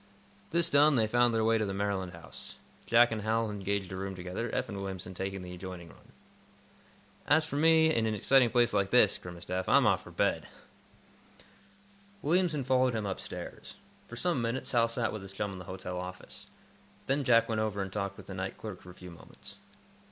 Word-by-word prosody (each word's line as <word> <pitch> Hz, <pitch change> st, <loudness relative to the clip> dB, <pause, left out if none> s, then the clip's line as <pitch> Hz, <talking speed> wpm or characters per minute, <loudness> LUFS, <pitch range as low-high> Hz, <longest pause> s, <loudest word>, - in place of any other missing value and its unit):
This 170 Hz, +1 st, +3 dB
done, 145 Hz, -1 st, +5 dB
they 115 Hz, -3 st, +3 dB
found 120 Hz, +2 st, +3 dB
their 115 Hz, -1 st, +1 dB
way 115 Hz, 0 st, +3 dB
to 110 Hz, -, 0 dB
the 95 Hz, -, -3 dB
Maryland 100 Hz, -3 st, -2 dB
House. 85 Hz, -2 st, -10 dB, 0.3 s
Jack 120 Hz, 0 st, +5 dB
and 110 Hz, -1 st, -2 dB
Hal 110 Hz, +1 st, 0 dB
engaged 100 Hz, -1 st, -3 dB
a -, -, -4 dB
room 95 Hz, 0 st, -4 dB
together, 90 Hz, +5 st, -4 dB
Eph 130 Hz, -, -1 dB
and 100 Hz, -3 st, -6 dB
Williamson 95 Hz, -2 st, -6 dB
taking 95 Hz, +1 st, -4 dB
the 90 Hz, 0 st, -8 dB
adjoining 90 Hz, -2 st, -8 dB
one. -, -, -19 dB, 1.2 s
"As 155 Hz, +2 st, +4 dB
for 155 Hz, -, -5 dB
me, 160 Hz, +1 st, +5 dB
in 115 Hz, -4 st, +1 dB
an 110 Hz, -, -1 dB
exciting 125 Hz, +4 st, +4 dB
place 120 Hz, -2 st, +3 dB
like 100 Hz, -1 st, +1 dB
this," 110 Hz, -4 st, +4 dB
grimaced 90 Hz, 0 st, -10 dB
Eph, 90 Hz, 0 st, -2 dB
"I'm -, -, +5 dB
off -, -, +3 dB
for -, -, -12 dB
bed." -, -, 0 dB, 1.8 s
Williamson 160 Hz, -2 st, +1 dB
followed 130 Hz, -1 st, +2 dB
him 110 Hz, -2 st, -2 dB
upstairs. 95 Hz, -1 st, -6 dB, 0.3 s
For 120 Hz, -, -9 dB
some 170 Hz, 0 st, +1 dB
minutes 115 Hz, +3 st, -2 dB
Hal 115 Hz, -2 st, +3 dB
sat 115 Hz, 0 st, -2 dB
with 110 Hz, -, -5 dB
his 95 Hz, 0 st, -9 dB
chum 100 Hz, 0 st, -3 dB
in 95 Hz, -, -8 dB
the 90 Hz, -, -9 dB
hotel 90 Hz, -1 st, -6 dB
office. 90 Hz, 0 st, -9 dB, 0.6 s
Then 140 Hz, +1 st, 0 dB
Jack 115 Hz, -2 st, +4 dB
went 110 Hz, -1 st, -1 dB
over 105 Hz, -2 st, -2 dB
and 95 Hz, -1 st, -4 dB
talked 100 Hz, -2 st, -3 dB
with -, -, -11 dB
the 95 Hz, -, -8 dB
night 95 Hz, 0 st, -4 dB
clerk 105 Hz, -5 st, -8 dB
for 90 Hz, -, -13 dB
a 90 Hz, -, -12 dB
few 90 Hz, -1 st, -11 dB
moments. 85 Hz, -, -12 dB
105 Hz, 205 wpm, -30 LUFS, 95-120 Hz, 1.8 s, done